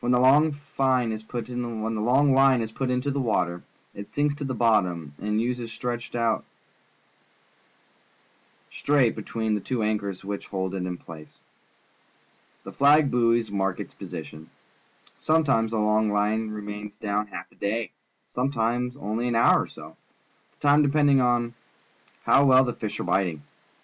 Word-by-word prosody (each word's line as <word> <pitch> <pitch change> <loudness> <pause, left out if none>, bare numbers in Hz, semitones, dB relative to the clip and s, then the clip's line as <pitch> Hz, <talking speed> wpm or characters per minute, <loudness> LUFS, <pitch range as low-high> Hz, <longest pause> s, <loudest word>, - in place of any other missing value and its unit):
TMien 120 - 0
the 125 - +4
long 145 +5 +5
fine 135 -4 0
is 110 0 -4
put 115 +1 -6 1.5
into 140 +3 -1
the 140 - -2
water, 90 -8 0 0.3
it 100 0 -9
sinks 145 0 0
to 145 0 -7
the 130 -2 -3
bottom 90 -10 +1
and 105 +1 0
Ues 120 0 -2
stretched 120 +1 -5
out 115 -2 0 2.3
straight 140 -5 +2
between 110 0 -3
the 105 - -1
two 120 +2 -2
anchors 100 -3 -2
which 100 0 -5
hold 95 -1 -3
it 90 -1 -3
in 90 -1 -4
place. 80 -3 -12 1.3
The - - -8
flag 145 +1 +4
buoys 115 -2 +2
mark 95 -2 -1
its - - -7
position. 80 +1 -9 0.7
Sometimes 140 -8 +2
the 115 - -2
long 105 0 +2
line 105 +2 0
remains 105 0 -7
down 105 0 -2
half - - -9
a - - -23
day, 110 +3 -2 0.4
sometimes 125 -1 -1
onh' 110 -4 -3
an 120 - -1
hour 115 - +5
or - - -5
so, - - -13 0.6
the 145 - -4
time 145 +1 +6
depending 145 -1 +3
upon 120 -1 +1 0.7
how 140 - +5
well 130 -1 +6
the 120 -2 -2
fish 110 -2 -5
are - - -2
biting. 90 -4 0
115 Hz, 150 wpm, -25 LUFS, 105-130 Hz, 2.3 s, time